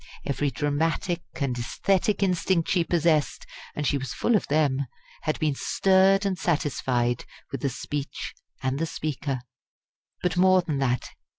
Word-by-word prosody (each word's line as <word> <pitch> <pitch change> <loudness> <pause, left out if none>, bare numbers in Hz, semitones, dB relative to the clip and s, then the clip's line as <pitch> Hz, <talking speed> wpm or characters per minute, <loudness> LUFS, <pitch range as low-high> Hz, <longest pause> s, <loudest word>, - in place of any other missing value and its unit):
Every 145 0 0
dramatic 160 +6 0
and 135 -4 -1
aesthetic 195 - +1
instinct 180 -2 +1
she 180 -3 +3
possessed 165 -3 +1 0.3
and 150 - -2
she 140 0 +2
was 135 - -5
full 235 - +2
of 210 - +1
them 140 -3 +2 0.4
had 155 - +1
been 155 -3 +1
stirred 195 +5 +3
and 190 -2 -1
satisfied 125 -7 0 0.3
by 135 - -3
the 140 - 0
speech 140 +3 -5 0.3
and 130 +1 0
the 165 - 0
speaker. 145 -4 -3 0.8
But 180 -1 0
more 185 0 +5
than 150 -5 -2
that. 125 -2 0
155 Hz, 150 wpm, -26 LUFS, 135-180 Hz, 0.8 s, more